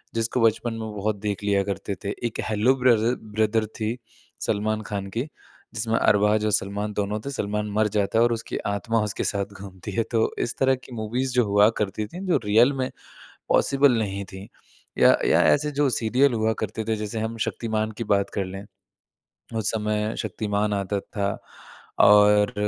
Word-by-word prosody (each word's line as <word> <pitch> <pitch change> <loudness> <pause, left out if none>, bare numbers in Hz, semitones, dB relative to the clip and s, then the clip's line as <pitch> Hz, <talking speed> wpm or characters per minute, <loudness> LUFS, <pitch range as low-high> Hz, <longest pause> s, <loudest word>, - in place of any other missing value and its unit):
जिसको 115 +2 0
बचपन 115 +1 +2
में 110 -1 -5
बहुत 105 +1 -1
देख 105 -1 -3
लिया 100 -1 +2
करते 100 0 -4
थे। 100 - -3 0.2
एक 115 - -8
हैलो 110 +5 +3
ब्ररर 120 -2 +3
ब्रदर 110 +1 0
थी 110 +2 -2 0.4
सलमान 110 +1 -1
खान 100 -1 -3
की, 115 +4 -2 0.5
जिसमें 115 0 -1
अरबाज़ 105 +1 +3
और 105 - +1
सलमान 105 +1 -1
दोनों 105 +1 -2
थे। - - -3
सलमान 105 -4 -2
मर 110 +1 +2
जाता 105 +2 +1
है 115 - +6
और 120 - +3
उसकी 115 0 -4
आत्मा 110 +3 0
उसके 105 - -3
साथ 100 0 -2
घूमती 95 +1 -8
है। 115 +3 0
तो 115 -2 +2
इस 120 - -4
तरह 135 0 +3
की 130 0 -16
मूवीज़ 120 +4 -2
जो 125 -2 +3
हुआ 100 +1 +5
करती 105 +1 -2
थीं 180 - -9
जो 175 - +3
रियल 115 +7 +5
में 130 -1 -2 0.6
पॉसिबल 140 -3 +4
नहीं 100 -2 -2
थीं 95 +2 -9 0.5
या, - - +6
या - - +4
ऐसे 150 +1 +3
जो 145 -1 +1
सीरियल 125 +3 +2
हुआ 110 0 +1
करते 110 +1 -3
थे 110 - +1
जैसे 105 +1 -4
हम 110 +1 -3
शक्तिमान 110 -1 -2
की 115 - -2
बात 100 -2 +1
कर 100 -2 -1
लें, 95 +1 -7 0.9
उस 110 -3 0
समय 105 0 -1
शक्तिमान 105 0 -1
आता 100 0 -1
था 100 0 -3 0.7
और 105 0 +6
110 Hz, 185 wpm, -24 LUFS, 105-115 Hz, 0.9 s, है